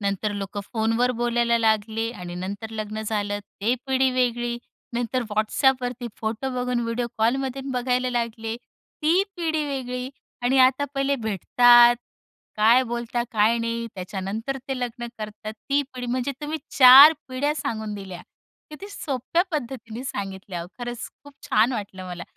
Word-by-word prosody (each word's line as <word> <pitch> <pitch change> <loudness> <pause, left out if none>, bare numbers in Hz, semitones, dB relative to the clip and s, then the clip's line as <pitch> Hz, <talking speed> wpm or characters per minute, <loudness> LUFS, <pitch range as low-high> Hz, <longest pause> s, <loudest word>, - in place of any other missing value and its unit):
नंतर 200 +1 -1
लोकं 200 0 -4
फोनवर 225 +2 +1
बोलायला 235 0 +2
लागले 220 0 +1
आणि 180 -4 -8
नंतर 200 +5 -5
लग्न 215 0 -5
झालं 205 -1 -2 0.2
ते 230 +5 +2
पिढी 265 0 +2
वेगळी. 240 -1 0 0.4
नंतर 245 +1 -1
Whatsappवरती 245 +3 +1
फोटो 225 +4 -3
बघून 250 -1 -1
व्हिडिओ 235 +1 -2
कॉलमधून 265 +3 0
बघायला 250 0 0
लागले 230 -1 -2
ती 320 +7 -1
पिढी 320 -3 -1
वेगळी. 255 -3 -4 0.3
आणि 260 +2 +2
आता 260 +2 +5
पहिले 275 +1 +1
भेटतात, 240 +3 +5 0.6
काय 230 +4 +5
बोलतात? 240 0 -3
काय 220 +2 +3
नाही? 230 0 -2
त्याच्यानंतर 195 +7 -4
ते 265 - -2
लग्न 240 -1 -4
करतात 215 0 -6
ती 280 +6 0
पिढी. 250 -1 -5
म्हणजे 255 +3 -1
तुम्ही 300 +2 -3 0.2
4 270 +4 +11 0.2
पिढ्या 285 +4 -1
सांगून 220 -7 -4
दिल्या. 190 -3 -8 0.5
किती 390 +7 -9
सोप्या 285 -1 -1
पद्धतीने 250 -5 -5
सांगितल्या 190 -6 -5
ओ. - - -9
खरंच 240 -1 -5 0.2
खूप 285 - -13
छान 220 +4 +2
वाटलं 200 -5 -5
मला 180 -1 -6
240 Hz, 140 wpm, -24 LUFS, 215-255 Hz, 0.6 s, 4